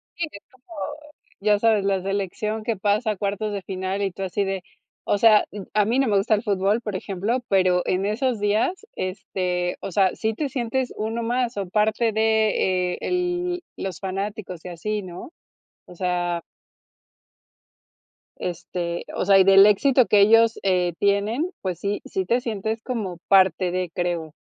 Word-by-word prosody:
Sí, 345 - -1
es 200 - -11
como, 255 +7 -17 0.7
ya 210 0 +3
sabes, 215 -3 +3
la 195 -1 +1
selección 200 +3 -2
que 230 +1 -1
pasa 210 +3 +1
a - - -3
cuartos 205 +1 -2
de 200 - -3
final, 190 +1 -3
y 195 -2 0
tú 195 - -6
así 190 +2 -1
de, 195 -1 -3 0.4
o 205 - +1
sea, 215 -1 +6
mm 205 -1 -7
A 210 -1 +3
mí 240 +5 +1
no 270 - +2
me 205 -2 +3
gusta 210 +3 +2
el 210 - -3
fútbol, 200 +2 +1
por 210 -3 -5
ejemplo, 200 +6 -2
pero 185 -2 +3
en 190 +2 0
esos 230 +2 0
días, 215 - 0
este, 185 -2 -2
o - - -5
sea, 190 0 +3
sí 220 0 -1
te 280 +5 -3
sientes 250 0 -2
uno 225 +2 -2
más, 245 0 -1
o, 195 -3 -3
parte 215 +3 +2
de, 215 -5 +1
eh, - - -11
el 355 0 -1 0.2
los 190 -1 -5
fanáticos, 195 -2 -5
y - - -5
así, 210 +5 -3
¿no? 180 - -9 0.6
O - - -13
sea. 175 -1 -1 2.0
Este, 175 0 -4
o - - -1
sea, 195 0 +6
y - - +7
del 195 +1 +8
éxito 250 +4 +4
que 205 - +4
ellos, 225 +2 +5
eh, 180 -3 +1
tienen. 205 - +1
Pues 180 -3 -3
sí, 205 +2 -2
sí 190 -1 -2
te 240 +6 +2
sientes 220 -1 -3
como 210 -9 -4
parte 185 -2 +4
de, 180 -1 -2
creo. 175 -3 -2
200 Hz, 175 wpm, -23 LUFS, 185-225 Hz, 2.0 s, del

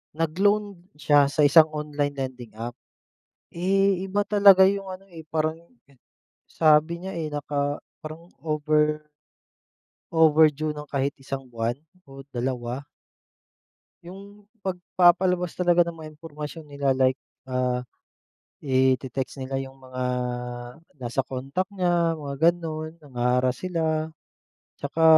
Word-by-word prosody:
nag-loan 200 +5 +1 0.2
siya 145 -1 +4
sa 145 +1 +1
isang 155 +2 +7
online 145 -1 -2
lending 125 -4 -6
app. 120 +2 -6 0.8
Eh, 190 +1 +2
iba 195 +2 -1
talaga 195 -2 +7
yung 200 0 -1
ano, 195 +1 -11
eh, 165 -3 -11
parang 155 0 0 0.9
sabi 155 +2 +3
niya, 190 - -5
eh, 160 -2 -2
naka 145 0 -2 0.2
parang 160 +3 -9 0.2
over 150 0 +1 1.1
overdue 155 -1 +4
ng 150 -1 -9
kahit 140 0 -1
isang 135 -1 -7
buwan 115 0 -2 0.3
o 135 -2 -12
2. 125 0 -3 1.2
'Yong 200 +3 -12 0.2
pagpapalabas 180 -1 +2
talaga 175 -1 +3
ng 170 - -6
mga 155 -1 -9
impormasyon 150 0 -8
nila 140 -1 0
like, 130 0 +2 0.3
ah, 125 -1 0 0.8
i-te-text 130 0 0
nila 130 +1 -4
'yung 135 0 -12
mga 130 -1 -6 1.0
nasa 125 +2 -1
contact 135 +10 -4
niya, 175 -3 +1
mga 145 +3 +2
gano'n, 160 -2 -6
nangha-harass 125 -2 0
sila. 160 -3 -1 0.7
Tsaka, 165 - -1
150 Hz, 115 wpm, -25 LUFS, 135-175 Hz, 1.2 s, isang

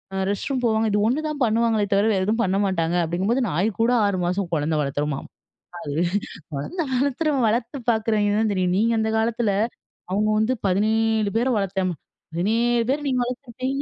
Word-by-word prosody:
அ - - -1
rest 205 - -2
room 255 -2 -1
போவாங்க. 220 0 +2
இது 205 - +2
ஒண்ணு 295 +6 0
தான் 290 -2 -5
பண்ணுவாங்களே! 225 -2 +1
தவிர, 200 +2 +3
வேற 190 - +1
எதுவும் 225 +3 +1
பண்ண 190 0 0
மாட்டாங்க 170 -2 0
அப்பிடிங்கும்போது, 195 +10 0
நாய் 180 +8 +1
கூட 235 - +3
6 200 -2 0
மாசம் 180 0 -1
குழந்த 155 +1 0
வளர்த்துமாம். 145 0 -2 0.5
அது 145 -4 -5 0.6
குழந்தை 335 - -3
வளர்த்துறவன், 280 +1 +1
வளர்த்து 235 +4 -1
பார்க்குறவங்க 215 -2 +1
தான் 215 -2 +1
தெரியும். 180 -1 +1
நீங்க 230 +2 +2
அந்த 220 0 0
காலத்தில, 225 -1 +1 0.6
அவுங்க 210 +3 +1
வந்து 225 +4 +1
17 215 +2 +1
பேர 240 - +1
வளர்த்தம், 190 -2 -1 0.4
17 230 +6 +1
பேர் 290 +1 -2
நீங்க 250 -1 +1
வளர்த்திருப்பீங்க. 255 +2 -4
220 Hz, 170 wpm, -23 LUFS, 190-240 Hz, 0.6 s, தவிர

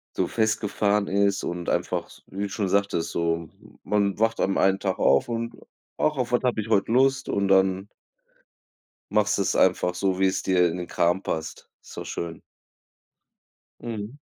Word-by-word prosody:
so - - +1
festgefahren 105 -2 0
ist 100 0 +1
und 85 0 -3
einfach, - - -1
s - - -17
wie 100 +1 -6
du 100 - -1
schon 100 -2 -2
sagtest, 100 -4 0
so 85 -1 -1 0.3
man 100 -1 0
wacht 115 +1 +1
an 95 - +1
einen 95 0 +3
Tag 95 -2 -2
auf 70 - +3
und: 115 0 -3 0.4
„Ach, 155 - +1
auf 125 -1 -2
was 120 - +2
habe 125 -3 +1
ich 110 - -6
heut 100 -3 +2
Lust?“, 135 +3 +2
und 100 -1 0
dann 95 0 +3 1.2
machst 105 0 +2
du 100 - +1
es - - 0
einfach 90 -1 +2
so, 95 0 0
wie 95 - +3
es 95 - 0
dir 90 -2 +3
in 90 - -5
den 90 - -5
Kram 85 +3 +1
passt. 80 -1 -5
Ist - - -12
doch - - -5
schön. 85 -1 -5 1.4
Mhm. 115 +3 -6
100 Hz, 180 wpm, -25 LUFS, 95-110 Hz, 1.4 s, einen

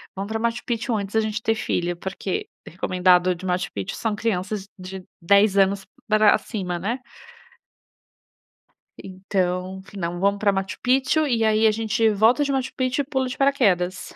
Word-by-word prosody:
Vamos 195 +2 -5
para 220 0 -2
Machu 235 +1 -1
Picchu 240 0 -1
antes 200 -1 -4
da 220 - +5
gente 215 0 -3
ter 225 0 +1
filho", 175 -4 -2
porque 190 +1 -4 0.2
recomendado 180 0 +2
de 175 - -13
Machu 180 0 -1
Picchu 100 -2 -4
são 220 -2 -2
crianças 205 -2 -2
de 185 0 -8 0.2
10 200 +3 +4
anos, 195 0 +3 0.2
pra 215 -1 +5
cima, 185 -6 -4
né. 220 +9 -3 2.0
Então, 185 0 -2
f 200 - -14
"Não, 175 -2 -3
vamos 200 +1 +2
pra 205 -2 +3
Machu 195 -1 -3
Picchu 265 +5 +2
e, 230 -4 +1
aí, 220 0 +3
a - - +6
gente 220 +1 +1
volta 220 +7 +3
de 280 - -2
Machu 265 -1 -1
Picchu 255 +2 0
e - - -11
pula 265 -2 -1
de 250 - -7
paraquedas". 195 -10 +1
200 Hz, 175 wpm, -23 LUFS, 185-225 Hz, 2.0 s, a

